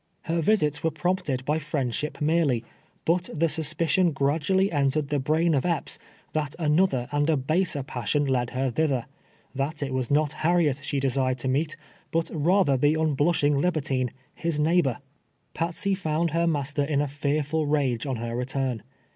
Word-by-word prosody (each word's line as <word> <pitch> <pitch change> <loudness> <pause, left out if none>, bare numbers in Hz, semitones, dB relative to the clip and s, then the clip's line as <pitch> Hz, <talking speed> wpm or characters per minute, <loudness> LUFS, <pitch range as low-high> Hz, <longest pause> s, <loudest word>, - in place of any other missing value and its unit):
Her 165 +1 0
visits 150 -6 +2
were 165 - +3
prompted 160 -5 -1
by 150 +2 +1
friendship 150 -2 -3
merely, 150 -6 +2 0.4
but 175 +2 +2
the 160 +2 +2
suspi 160 +1 0
cion 170 +2 +3
gradually 160 +8 +1
entered 145 -1 +1
the 145 -1 +1
brain 160 +5 +2
of 135 - +2
Epps, 170 -2 -1 0.3
that 150 -2 -2
another 150 -5 +2
and 145 +1 +1
a 155 - +3
baser 155 +2 0
passion 130 +2 -1
led 125 -3 0
her 130 +1 -1
thither 130 -2 0 0.3
— - - -34
that 145 +1 -2
it 135 -2 -3
was 130 -2 -1
not 150 +1 +2
Harriet 160 -4 +2
she 140 - -1
desired 130 -1 0
to 130 - -4
meet, 150 +5 0 0.3
but 165 0 -1
rather 160 -2 +3
the 145 +4 +3
unblush 155 +1 +1
ing 145 -1 +3
libertine, 140 -7 0 0.2
his 165 -3 -2
neighbor. 155 -4 +2 0.6
Patsey 170 +4 -1
found 165 -3 0
her 170 +2 +1
master 145 -2 0
in 140 0 0
a 145 - +1
fearful 145 +2 -1
rage 140 -4 0
on 135 - -1
her 115 0 -4
return. 125 -1 -2
150 Hz, 170 wpm, -26 LUFS, 135-165 Hz, 0.6 s, were